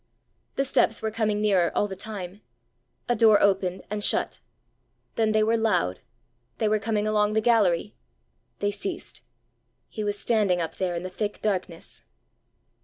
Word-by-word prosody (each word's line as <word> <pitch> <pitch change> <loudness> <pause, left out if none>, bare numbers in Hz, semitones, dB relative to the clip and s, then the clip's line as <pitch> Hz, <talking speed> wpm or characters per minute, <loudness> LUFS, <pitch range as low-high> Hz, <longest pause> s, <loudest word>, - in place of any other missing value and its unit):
The 275 - 0
steps 225 -4 +1
were 220 - -1
coming 215 -1 0
nearer 190 -5 +2
all 205 - +2
the 190 - -6
time. 200 -1 -7 0.7
A 240 - +2
door 215 -2 +6
opened 190 -2 +1
and 210 0 -2
shut. - - +2 0.7
Then 220 -1 +1
they 215 0 +3
were 225 +2 +2
loud 95 - 0 0.6
they 220 - +1
were 215 0 +2
coming 215 -1 -1
along 210 0 +1
the 220 - +3
gallery! 215 -7 +2 0.6
They 205 0 0
ceased. 335 - -5 0.7
He 215 - -5
was 205 0 -1
standing 205 -5 +1
up 165 -1 -4
there 180 -2 -1
in 170 - -4
the 185 - -4
thick 205 +2 -4
darkness! 185 -5 -3
210 Hz, 160 wpm, -26 LUFS, 185-220 Hz, 0.7 s, door